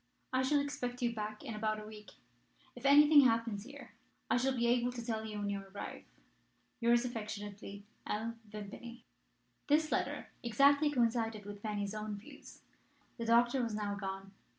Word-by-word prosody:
I 255 - +3
shall 285 +3 +3
expect 250 -3 -3
you 235 -1 +1
back 215 -1 -5
in - - -5
about 215 0 -1
a 215 - -8
week. 210 -2 -11 0.6
If 245 +2 -2
anything 295 +1 +8
happens 230 -4 +1
here 270 -4 -11 0.4
I - - +5
shall 260 +1 +1
be 235 - +1
able 245 +1 +2
to 240 -2 -6
tell 220 -2 -2
you 215 -1 -5
when 205 -1 -2
you 200 -1 -2
arrive. 195 +1 -8 0.7
"Yours 235 +1 +4
affectionately, 205 -3 -6 0.2
L. 220 +2 -2 0.2
Vimpany." 215 +4 -8 0.6
This 305 +1 +3
letter - - -1
exactly 280 +6 +4
coincided 230 -5 0
with 205 0 -8
Fanny's 205 -1 -2
own 215 -1 -4
views. 205 - -13 0.6
The 230 - -2
doctor 240 +3 +4
was 230 -3 -2
now 205 -1 -2
gone. 195 -1 -5
225 Hz, 165 wpm, -34 LUFS, 210-245 Hz, 0.7 s, anything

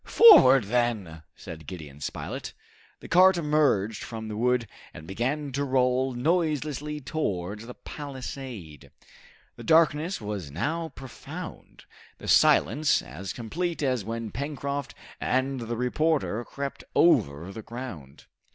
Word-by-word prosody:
"Forward, 135 - +8
then!" 105 -7 -1
said 80 -2 -10
Gideon 75 -5 -9
Spilett. - - -5 0.5
The - - -9
cart 185 +1 +6
emerged 150 - +1
from 110 -1 -6
the 105 - -5
wood 125 +2 +1 0.3
and 75 - -10
began 135 - -2
to 140 +2 -1
roll 130 -1 +1
noiselessly 150 0 -1
towards 105 - -3
the 125 - -9
palisade. 130 - -8 0.7
The - - -9
darkness 160 +2 +3
was 105 -7 -5
now 160 - -2
profound, 130 -2 -9 0.3
the - - -10
silence 155 +1 +4
as 90 +5 -7
complete 165 +8 -3
as 130 -5 0
when 115 0 -5
Pencroft 140 0 -4 0.2
and 130 +1 0
the 115 0 -4
reporter 125 -1 0
crept 140 0 -6
over 95 - +3
the 110 - -7
ground. 110 - -9
125 Hz, 125 wpm, -27 LUFS, 105-150 Hz, 0.7 s, Forward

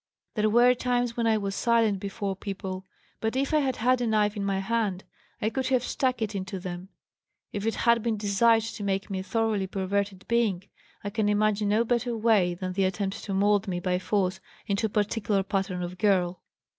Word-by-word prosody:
There 215 -1 +2
were 240 +3 +6
times 245 -1 0
when 235 -1 0
I 220 -1 +3
was 200 -2 -2
silent 225 -2 +2
before 200 0 -3
people, 190 -1 -6 0.3
but 220 +2 -1
if 275 +3 0
I 305 - +5
had 265 -3 0
had 250 +2 +2
a 240 - 0
knife 210 -1 +2
in 205 - -3
my 195 -1 0
hand 195 -2 -1 0.4
I 215 - 0
could 260 +3 -1
have 255 -2 +2
stuck 255 -2 0
it 215 0 -3
into 190 -1 -4
them. 180 +1 -6 0.6
If 205 +1 -2
it 225 - 0
had 235 -1 +3
been 225 -1 -1
desired 220 +2 +3
to 225 -2 -6
make 195 0 -1
me 190 - -2
a - - -4
thoroughly 210 -1 0
perverted 195 0 -2
being 225 -6 +1 0.4
I 205 - -4
can 215 0 +1
imagine 210 0 +2
no 215 +3 +3
better 240 0 0
way 210 -6 +3
than 185 0 -4
the 195 0 +1
attempt 195 +2 -2
to 200 - -3
mould 205 +1 +3
me 180 -2 -2
by 180 0 0
force 190 -1 0 0.3
into 205 +2 0
a - - -10
particular 205 -1 0
pattern 190 -2 -2
of 180 +1 -6
girl. 185 -4 +2
205 Hz, 205 wpm, -27 LUFS, 195-230 Hz, 0.6 s, were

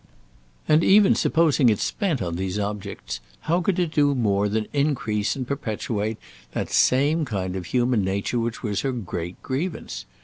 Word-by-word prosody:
And 155 +2 +4
even 200 0 +6
supposing 155 -6 +3
it 105 - +2
spent 165 - -1
on 85 -1 -3
these 95 +2 -2
objects, 100 - -4 0.2
how 175 +3 +1
could 185 +1 0
it 175 -3 0
do 145 -2 +3
more 105 -4 +1
than 110 +1 -1
increase 115 -8 0
and 130 -3 -4
perpetuate 110 -5 -2 0.4
that - - -3
same 145 +5 +3
kind 95 -8 -3
of 90 -3 -5
human 120 -1 +1
nature 100 +5 -1
which 115 0 -3
was 105 -3 -1
her 135 - -1
great 90 -6 -5
grievance? 155 +6 -4
115 Hz, 165 wpm, -24 LUFS, 100-145 Hz, 0.4 s, even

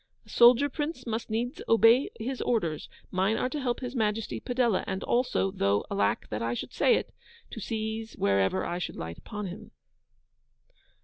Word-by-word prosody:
'A - - -20
soldier, 245 +4 +6
Prince, 295 -1 -4
must 230 0 -3
needs 235 +4 -2
obey 230 +4 +5
his 250 +3 -3
orders: 170 -11 -1 0.2
mine 190 +4 +1
are - - 0
to 290 +2 -4
help 245 -1 -1
His 250 0 -5
Majesty 215 -1 -1
Padella. 245 -5 +1
And 190 0 -3
also 165 - +1
(though 100 +2 +1
alack 100 0 0
that 105 +1 -3
I 115 +1 -1
should 250 - -6
say 485 - +4
it!) - - -3 0.4
to - - -7
seize 220 0 -4
wherever 95 -1 +1
I 175 - -3
should - - -4
light 85 +1 -6
upon 210 0 -6
him. 180 0 -8
220 Hz, 175 wpm, -28 LUFS, 170-245 Hz, 0.4 s, soldier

